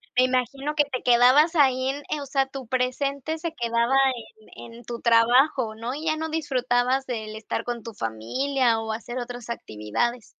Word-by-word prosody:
Me 255 0 +5
imagino 270 +3 -1
que 295 -1 +4
te 260 -3 -4
quedabas 255 +7 +5
ahí 260 -3 +3
en, 275 - -1
eh, 300 - -2
o - - -6
sea, 270 0 +1
tu 270 -2 -9
presente 275 +4 -1
se 330 0 -4
quedaba 235 +2 +1 0.7
en 230 - -11
en 240 - -13
tu 235 -1 -6
trabajo, 235 +1 +4
¿no?, 235 +4 -4
y 310 - -6
ya 310 -1 +1
no 320 0 -3
disfrutabas 260 -4 0
del 220 -3 -5
estar 225 +1 -4
con 240 -1 -4
tu 230 - -9
familia, 230 - 0
o 220 0 -4
hacer 235 +3 -5
otras 245 -1 -6
actividades. 215 - -3
250 Hz, 185 wpm, -25 LUFS, 235-275 Hz, 0.7 s, Me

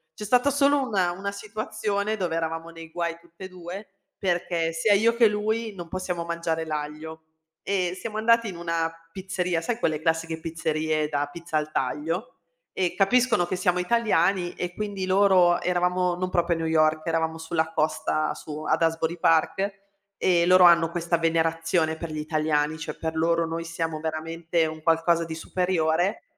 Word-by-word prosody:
c'è 210 - -8
stata 250 +6 +3
solo 285 0 +3
una 190 -6 +1
una 195 +3 -4
situazione 215 0 -3
dove 175 -4 -2
eravamo 165 0 -3
nei 165 -1 -11
guai 170 0 -2
tutt'e 170 +2 -12
2, 185 +3 -8 0.3
perché 175 -3 0
sia 165 +6 +3
io 225 +3 +3
che 235 -1 +6
lui 215 +1 -1
non 175 -2 -7
possiamo 180 -1 -3
mangiare 170 -1 -2
l'aglio. 155 +1 -5 0.4
E 185 -2 -1
siamo 215 +1 -5
andati 230 +1 +3
in 180 - -8
una 165 -1 -1 0.2
pizzeria, 185 -2 -2
sai 225 +8 -2
quelle 155 -8 0
classiche 160 0 -1
pizzerie 160 -1 -1
da 145 -1 -1
pizza 170 -1 -3
al 150 0 -2
taglio? 160 - -2 0.5
Ehm, 180 -2 0
capiscono 230 -1 +3
che 185 - -2
siamo 180 0 +1
italiani 180 -3 +1
e 175 0 -4
quindi 205 -3 -3
loro 185 -2 +4
eravamo, 180 0 +1
non 185 +1 -2
proprio 170 0 +1
a - - -5
New 165 - -1
York, 155 -1 +2
eravamo 160 0 0
sulla 160 0 -2
costa, 155 0 0
su 155 0 -7
ad 155 +1 +1
Asbury 165 +1 0
Park, 165 +5 +2 0.5
ehm, 175 -2 +3
loro 185 0 +7
hanno 170 -1 +6
questa 170 0 0
venerazione 165 0 +1
per 165 0 -6
gli 155 - -5
italiani, 155 0 0
cioè 160 - -6
per 160 0 -4
loro 165 +1 +2
noi 165 +1 -4
siamo 165 -1 -3
veramente 160 +1 -1
un 155 0 -7
qualcosa 165 +1 +3
di 160 0 -6
superiore. 175 +1 0
170 Hz, 170 wpm, -25 LUFS, 160-185 Hz, 0.5 s, loro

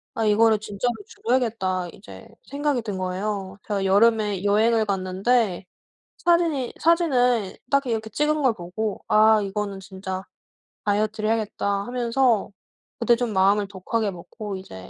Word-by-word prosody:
'아 225 - -1
이거를 215 0 +4
진짜로 215 +3 -2
줄여야겠다.' 225 - -1
이제 205 +2 -13 0.2
생각이 285 -3 0
든 205 -4 -4
거예요. 190 +1 -3
제가 200 -2 -1
여름에 210 -1 +3
여행을 220 +2 +3
갔는데 195 +1 0 0.5
사진이 335 -7 +1
사진을 250 - +2
딱 280 -1 +2
이렇게 220 -2 -2
찍은 300 +4 0
걸 255 -3 +4
보고 195 +4 -4
'아 215 0 +5
이거는 200 0 -3
진짜 190 0 -6 0.6
다이어트를 215 +1 0
해야겠다.' 205 -2 -1
하면서 245 -2 +1 0.5
그때 240 - +4
좀 240 -3 -2
마음을 200 +1 +3
독하게 200 +2 -2
먹고 195 +3 -7
이제 95 - -11
215 Hz, 315 characters per minute, -24 LUFS, 195-240 Hz, 0.6 s, 아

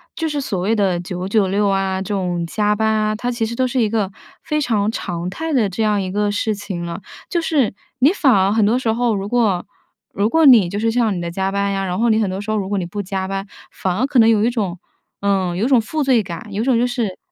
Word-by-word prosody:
就 325 -1 -2
是 295 -1 -2
所 205 -9 -3
谓 215 +5 +1
的 190 -5 +1
九 180 +1 -5
九 205 -1 +2
六 200 +2 +1
啊， 195 -1 0
这 200 +2 -4
种 180 -3 -1
加 210 +4 0
班 220 +1 0
啊， 215 0 +1
它 245 +3 -2
其 235 -1 -2
实 230 +1 -2
都 255 +1 +1
是 250 0 0
一 215 - +2
个 205 -3 -1 0.3
非 300 0 -1
常 215 -5 +1
常 175 -5 -4
态 320 +8 -4
的 240 -7 +2
这 195 +4 -4
样 210 -2 +2
一 185 -1 -3
个 205 +1 0
事 215 +1 0
情 195 -4 -5
了。 170 - -6 0.3
就 345 - -1
是 285 -11 +1 0.3
你 280 +7 +5
反 280 -9 +3
而 195 -1 +3
很 220 - +3
多 235 +3 +2
时 225 -3 0
候， 235 -2 +1
如 195 +1 -3
果 215 -6 +1 0.5
如 205 +2 +1
果 320 +2 +3
你 225 -10 +7
就 200 - -4
是 225 +1 +1
像 230 -1 +2
是 195 - -1
你 175 - -3
的 170 0 -4
加 190 +2 -1
班 200 0 0
呀， 195 0 -1
然 180 +2 -2
后 235 0 +2
你 220 - +3
很 200 - 0
多 190 +1 -4
时 210 +1 -4
候， 215 - +1
如 195 -2 -3
果 205 - -1
你 180 - -2
不 205 +4 -4
加 190 0 -3
班， 195 +1 -4 0.2
反 185 -1 -2
而 255 - +2
可 275 -3 +2
能 225 0 +6
有 215 -1 +3
一 - - +3
种 195 -7 -2 0.4
呃， 190 -3 0
有 215 - 0
一 - - +2
种 255 -4 +4
负 305 +7 -2
罪 255 -5 +3
感， 195 +3 -8
有 205 - -1
一 - - -1
种 255 -3 +3
就 245 - +2
是 235 -6 -2
210 Hz, 305 characters per minute, -19 LUFS, 190-235 Hz, 0.5 s, 你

